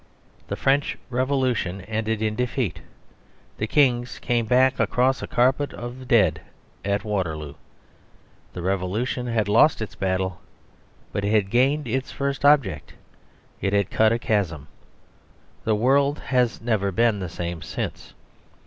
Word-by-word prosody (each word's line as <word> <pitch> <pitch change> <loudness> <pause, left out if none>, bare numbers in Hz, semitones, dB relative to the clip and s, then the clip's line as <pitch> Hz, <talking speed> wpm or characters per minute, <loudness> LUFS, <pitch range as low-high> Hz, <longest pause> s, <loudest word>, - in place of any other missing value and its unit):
The - - -3
French 140 +2 +1
Revolution 125 -7 0
ended 110 +2 -2
in 110 -1 0
defeat: 125 - -2 0.8
the 110 - -1
kings 125 -3 +2
came 120 -2 -1
back 130 +3 +3
across 130 +2 +2
a - - -5
carpet 130 +4 +1
of 125 +2 -8
dead 115 -3 +3 0.4
at 100 +1 -1
Waterloo. 80 -9 -3 1.0
The 90 - -6
Revolution 100 +7 -1
had 110 -4 0
lost 115 +9 +4
its 110 -4 -5
last - - -21
battle; 95 -1 -1 0.7
but 100 - -2
it 100 - 0
had 105 -3 +2
gained 135 +4 +2
its 130 +3 -2
first 140 0 -3
object. 105 - +3 0.7
It 100 0 0
had 100 -2 +1
cut 110 0 +4
a 115 - +2
chasm. 90 -11 -1 1.0
The 110 - +2
world 140 +6 +3
has 125 -3 0
never 105 -4 0
been 115 +2 +2
the 90 -3 -4
same 85 0 -5
since. - - -6
110 Hz, 140 wpm, -24 LUFS, 100-130 Hz, 1.0 s, lost